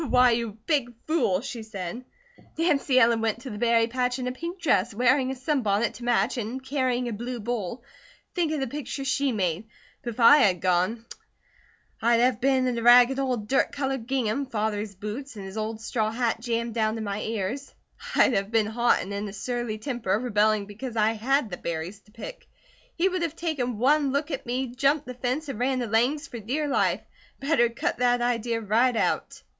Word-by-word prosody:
"Why, 250 Hz, 0 st, +5 dB
you 230 Hz, -2 st, -2 dB
big 265 Hz, -7 st, 0 dB
fool!" 260 Hz, -, +1 dB
she 245 Hz, -2 st, -6 dB
said. 215 Hz, +1 st, -6 dB, 0.5 s
"Nancy 295 Hz, -5 st, +3 dB
Ellen 230 Hz, -2 st, +4 dB
went 225 Hz, +1 st, -1 dB
to 260 Hz, -, -6 dB
the 210 Hz, -, -6 dB
berry 230 Hz, -1 st, +3 dB
patch 250 Hz, +1 st, -1 dB
in 255 Hz, -, -4 dB
a 250 Hz, -, -1 dB
pink 335 Hz, +8 st, -6 dB
dress, 235 Hz, -, +1 dB
wearing 255 Hz, +3 st, +3 dB
a 265 Hz, -, -3 dB
sunbonnet 240 Hz, -6 st, 0 dB
to 245 Hz, -, -11 dB
match, 240 Hz, +1 st, +1 dB
and 240 Hz, +3 st, -4 dB
carrying 255 Hz, -2 st, 0 dB
a 235 Hz, -, -3 dB
blue 240 Hz, +3 st, -5 dB
bowl. 230 Hz, -1 st, -4 dB, 0.5 s
Think 340 Hz, -4 st, 0 dB
of 310 Hz, -, -1 dB
the -, -, +1 dB
picture 275 Hz, +1 st, -5 dB
she 270 Hz, +1 st, +1 dB
made! 185 Hz, -3 st, -1 dB, 0.4 s
But 240 Hz, -, -4 dB
if -, -, -14 dB
I 245 Hz, +5 st, +8 dB
had 195 Hz, -, +3 dB
gone, 185 Hz, +6 st, +1 dB, 1.0 s
I'd 230 Hz, +1 st, +4 dB
have 245 Hz, -1 st, +2 dB
been 265 Hz, 0 st, +3 dB
in 245 Hz, -2 st, 0 dB
a -, -, -4 dB
ragged 245 Hz, +3 st, +7 dB
old 250 Hz, -6 st, -1 dB
dirt 270 Hz, -, +2 dB
coloured 270 Hz, -4 st, -3 dB
gingham, 265 Hz, 0 st, 0 dB
Father's 210 Hz, -3 st, -2 dB
boots, 220 Hz, +7 st, -6 dB
and 200 Hz, -2 st, -7 dB
his 190 Hz, +1 st, -8 dB
old 220 Hz, 0 st, -3 dB
straw 225 Hz, -1 st, -1 dB
hat 230 Hz, 0 st, -1 dB
jammed 235 Hz, -1 st, -2 dB
down 220 Hz, -1 st, 0 dB
to 225 Hz, -, -4 dB
my 205 Hz, -1 st, -3 dB
ears; 225 Hz, +5 st, -3 dB, 0.4 s
I'd -, -, +5 dB
have 195 Hz, -1 st, 0 dB
been 225 Hz, -1 st, +2 dB
hot 235 Hz, +3 st, +2 dB
and 200 Hz, -, -6 dB
in 200 Hz, +1 st, -3 dB
a -, -, -9 dB
surly 240 Hz, +1 st, -3 dB
temper, 225 Hz, -5 st, -1 dB
rebelling 215 Hz, -3 st, +2 dB
because 225 Hz, +4 st, -7 dB
I 215 Hz, 0 st, +3 dB
had 235 Hz, +1 st, 0 dB
the 175 Hz, -, -4 dB
berries 170 Hz, +4 st, -4 dB
to 210 Hz, -, -25 dB
pick. -, -, -9 dB, 0.5 s
He 355 Hz, +2 st, +2 dB
would 370 Hz, -1 st, -1 dB
have 330 Hz, -2 st, -2 dB
taken 270 Hz, -10 st, -2 dB
one 280 Hz, +4 st, +3 dB
look 290 Hz, +4 st, -1 dB
at 270 Hz, -, -4 dB
me, 250 Hz, 0 st, -2 dB
jumped 280 Hz, +3 st, +2 dB
the 250 Hz, -, -6 dB
fence, 255 Hz, +5 st, -2 dB
and 265 Hz, -6 st, -5 dB
run 260 Hz, +1 st, +1 dB
to 245 Hz, -, -1 dB
Lang's 245 Hz, +8 st, +1 dB
for 235 Hz, -, -7 dB
dear 270 Hz, +8 st, -2 dB
life. 275 Hz, -, +1 dB, 0.4 s
Better 275 Hz, -4 st, +2 dB
cut 235 Hz, -, -2 dB
that 245 Hz, 0 st, +3 dB
idea 235 Hz, -1 st, 0 dB
right 230 Hz, +4 st, +2 dB
out!" -, -, -1 dB
240 Hz, 205 wpm, -26 LUFS, 220-265 Hz, 1.0 s, I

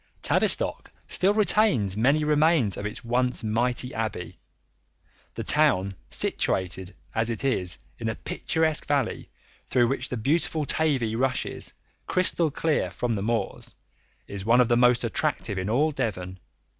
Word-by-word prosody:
Tavistock -, -, 0 dB, 0.2 s
still 195 Hz, +3 st, +1 dB
retains 205 Hz, -, +2 dB
many 140 Hz, +8 st, +2 dB
remains 150 Hz, -, +3 dB
of 100 Hz, -, -4 dB
its 110 Hz, +3 st, -7 dB
once 125 Hz, +1 st, 0 dB
mighty 120 Hz, +3 st, -1 dB
abbey. 110 Hz, -5 st, -4 dB, 1.0 s
The -, -, -4 dB
town, 95 Hz, +2 st, +2 dB, 0.2 s
situated 95 Hz, 0 st, 0 dB, 0.2 s
as 115 Hz, +1 st, 0 dB
it 115 Hz, +2 st, -3 dB
is 90 Hz, -10 st, +1 dB, 0.2 s
in 115 Hz, -1 st, -2 dB
a 110 Hz, -, -3 dB
picturesque 160 Hz, -1 st, -1 dB
valley 140 Hz, -5 st, -1 dB, 0.4 s
through 120 Hz, -2 st, +2 dB
which 135 Hz, -, -1 dB
the 125 Hz, -, -3 dB
beautiful 155 Hz, +5 st, 0 dB
Tavy 135 Hz, -8 st, +1 dB
rushes, 130 Hz, +1 st, -2 dB, 0.3 s
crystal 180 Hz, -3 st, +3 dB
clear, 155 Hz, +2 st, 0 dB
from 120 Hz, -1 st, -2 dB
the 100 Hz, -, -2 dB
moors, 115 Hz, +2 st, -3 dB, 0.5 s
is 100 Hz, -1 st, -6 dB
one 115 Hz, +4 st, +4 dB
of 125 Hz, -1 st, +4 dB
the 120 Hz, -, +4 dB
most 125 Hz, 0 st, +4 dB
attractive 100 Hz, -3 st, -1 dB
in 95 Hz, +2 st, -3 dB
all 145 Hz, +8 st, +2 dB
Devon. 95 Hz, -8 st, -4 dB
120 Hz, 145 wpm, -26 LUFS, 105-145 Hz, 1.0 s, one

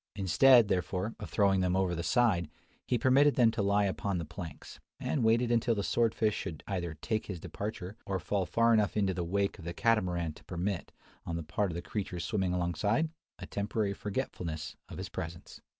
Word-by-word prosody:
Instead, 115 Hz, +5 st, +6 dB
therefore, 95 Hz, +3 st, -1 dB
of -, -, -7 dB
throwing 100 Hz, -2 st, +3 dB
them 90 Hz, 0 st, +1 dB
over 95 Hz, -2 st, +1 dB
the 85 Hz, -, -2 dB
side, 95 Hz, -, +2 dB, 0.4 s
he 125 Hz, -, +2 dB
permitted 135 Hz, +4 st, +4 dB
them 120 Hz, -3 st, +5 dB
to 115 Hz, -1 st, -2 dB
lie 100 Hz, +1 st, +3 dB
upon 100 Hz, 0 st, -1 dB
the 85 Hz, -, -3 dB
planks, 85 Hz, +1 st, -9 dB, 0.2 s
and 140 Hz, -, -1 dB
waited 115 Hz, +2 st, +3 dB
until 115 Hz, 0 st, +2 dB
the 100 Hz, -, -1 dB
sword 115 Hz, +1 st, +1 dB
fish 110 Hz, -2 st, +2 dB
should 85 Hz, -7 st, -5 dB
either 85 Hz, -5 st, -3 dB
take 110 Hz, -1 st, -1 dB
his 90 Hz, -4 st, -5 dB
departure 100 Hz, +1 st, -5 dB
or 95 Hz, -1 st, 0 dB
fall 95 Hz, +1 st, -1 dB
far 115 Hz, 0 st, +3 dB
enough 105 Hz, -4 st, +2 dB
into 100 Hz, -2 st, +2 dB
the 90 Hz, 0 st, -2 dB
wake 100 Hz, +4 st, -1 dB
of -, -, -10 dB
the 85 Hz, +1 st, -5 dB
Catamaran 90 Hz, -8 st, +1 dB
to -, -, -17 dB
permit, 90 Hz, +1 st, -3 dB, 0.3 s
on 85 Hz, -, -4 dB
the 85 Hz, -, -3 dB
part 95 Hz, +6 st, -1 dB
of 85 Hz, -, -5 dB
the 85 Hz, -, -4 dB
creatures 90 Hz, -5 st, -4 dB
swimming 95 Hz, 0 st, 0 dB
alongside, 90 Hz, -, +1 dB, 0.3 s
a -, -, -7 dB
temporary 100 Hz, 0 st, -1 dB
forgetfulness 85 Hz, -6 st, -4 dB
of -, -, -8 dB
his -, -, -4 dB
presence. 85 Hz, +1 st, -7 dB
100 Hz, 200 wpm, -31 LUFS, 85-110 Hz, 0.4 s, Instead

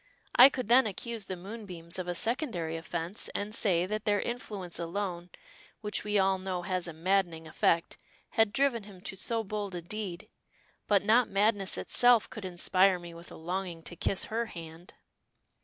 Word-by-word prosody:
I 255 Hz, +3 st, +10 dB
could 255 Hz, -5 st, -4 dB
then 245 Hz, +1 st, +6 dB
accuse 225 Hz, +1 st, -4 dB
the 185 Hz, -, -4 dB
moonbeams 185 Hz, -3 st, -7 dB
of 180 Hz, -, -4 dB
a 175 Hz, -, -2 dB
secondary 180 Hz, -, -1 dB
offense, 165 Hz, +4 st, -3 dB
and 205 Hz, +1 st, -3 dB
say 180 Hz, -6 st, +2 dB
that 215 Hz, +2 st, -3 dB
their 205 Hz, -1 st, +3 dB
influence 205 Hz, -8 st, -5 dB
alone, 175 Hz, 0 st, -3 dB, 0.5 s
which 210 Hz, -1 st, -2 dB
we 210 Hz, 0 st, +1 dB
all 190 Hz, -1 st, +3 dB
know 185 Hz, -1 st, -3 dB
has 185 Hz, -1 st, -1 dB
a -, -, -5 dB
maddening 170 Hz, 0 st, 0 dB
effect, 165 Hz, +1 st, +1 dB, 0.3 s
had 225 Hz, -2 st, +3 dB
driven 270 Hz, -3 st, +2 dB
him 195 Hz, -3 st, -13 dB
to 195 Hz, -, -4 dB
so 225 Hz, +4 st, -1 dB
bold 205 Hz, -2 st, -4 dB
a 175 Hz, -, -4 dB
deed. 190 Hz, -1 st, -5 dB, 0.6 s
But 200 Hz, -1 st, +3 dB
not 235 Hz, +4 st, +4 dB
madness 200 Hz, -1 st, +2 dB
itself 245 Hz, -2 st, +4 dB
could 215 Hz, -3 st, -8 dB
inspire 185 Hz, +1 st, +3 dB
me 175 Hz, -1 st, -10 dB
with 170 Hz, +1 st, -11 dB
a -, -, -9 dB
longing 175 Hz, 0 st, -4 dB
to 175 Hz, -, -7 dB
kiss 190 Hz, +3 st, 0 dB
her 230 Hz, +1 st, -2 dB
hand." 165 Hz, -1 st, -10 dB
195 Hz, 175 wpm, -30 LUFS, 175-215 Hz, 0.6 s, I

